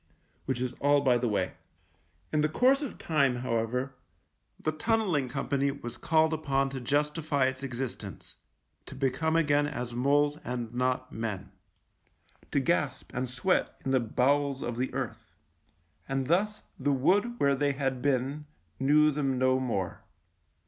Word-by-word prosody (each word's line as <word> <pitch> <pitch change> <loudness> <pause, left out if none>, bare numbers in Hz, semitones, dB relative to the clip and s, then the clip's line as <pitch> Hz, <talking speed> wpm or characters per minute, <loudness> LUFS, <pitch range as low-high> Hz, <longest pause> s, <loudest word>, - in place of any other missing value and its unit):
Which 130 -2 -1
is 125 -1 -2
all 145 0 +4
by 125 -3 +3
the 120 - 0
way. 100 -4 0 0.8
In 155 - +3
the 155 - +2
course 260 - +4
of 285 - -5
time, 140 -6 +2
however, 125 +2 -1 0.7
the 155 - 0
Tunnel 220 +6 0
ling 145 -6 +1
Company 140 +1 0
was 120 -3 -6
called 160 +3 +2
upon 135 -3 0
to 135 -1 -5
justify 145 +1 +1
its 130 0 -2
existence 125 -7 -6 0.3
— - - -46
to - - -9
become 135 +4 0
again 145 -3 +3
as 120 -4 -4
moles 145 +4 +2
and 120 -2 -4
not 130 +1 -1
men, 110 -3 -4 1.0
to - - +2
gasp 140 -3 -1
and 125 0 -2
sweat 135 +10 0
in 135 - 0
the 130 - +4
bowels 135 +4 +1
of 120 -1 -3
the 130 +1 -1
earth - - -5 0.4
— 85 -1 -40
and 135 -1 0
thus 205 +8 +1 0.2
the 145 +2 +1
wood 200 - +2
where 140 0 +4
they 140 +1 +1
had 135 -2 -2
been 140 +2 0 0.3
knew 150 +3 +5
them 135 -3 0
no 130 0 +3
more. 105 -8 -2
135 Hz, 160 wpm, -29 LUFS, 125-150 Hz, 1.0 s, knew